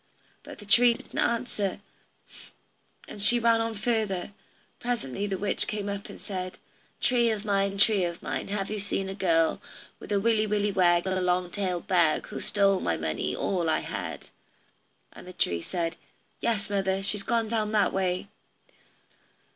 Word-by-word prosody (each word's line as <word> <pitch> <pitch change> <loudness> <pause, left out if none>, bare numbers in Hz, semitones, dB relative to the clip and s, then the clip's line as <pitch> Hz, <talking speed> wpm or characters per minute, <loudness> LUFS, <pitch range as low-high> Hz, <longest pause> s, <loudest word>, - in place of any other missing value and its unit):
But - - -11
the 205 - -12
tree 235 +3 +5
didn't - - -7
answer, 230 -5 0 1.3
and 205 - -8
she 240 +4 +5
ran 230 -1 +3
on 225 0 -2
further. 210 -4 -1 0.5
Presently 205 - -2
the 195 -1 -2
witch 205 +1 +1
came 210 -1 -3
up 200 0 -4
and - - -10
said: 185 -2 -5 0.4
"Tree 240 -2 +3
of 215 -1 -2
mine, 200 -1 +1
tree 200 -1 +4
of 170 0 -4
mine, - - -3
Have 200 0 -3
you 215 - -2
seen 195 -1 -2
a - - -3
girl, 165 -4 +2 0.4
With - - -10
a 200 - +3
willy 220 0 +2
willy 210 0 +1
wag, 175 -2 +3
and 190 0 0
a - - -1
long 180 0 +1
tailed 185 -3 -2
bag, 170 -4 +3
Who's - - -5
stole 200 -2 +3
my 85 - 0
money, 80 -2 -2
all 175 -4 0
I 160 - +2
had?" - - -5 0.9
The 180 0 -10
tree 85 - 0
said, 170 - -3 0.4
"Yes, 215 -3 0
mother; 195 -1 0
she's 200 +1 +1
gone 230 +1 0
down 215 -1 0
that 210 -1 +3
way." 185 0 0
200 Hz, 170 wpm, -28 LUFS, 185-215 Hz, 1.3 s, tree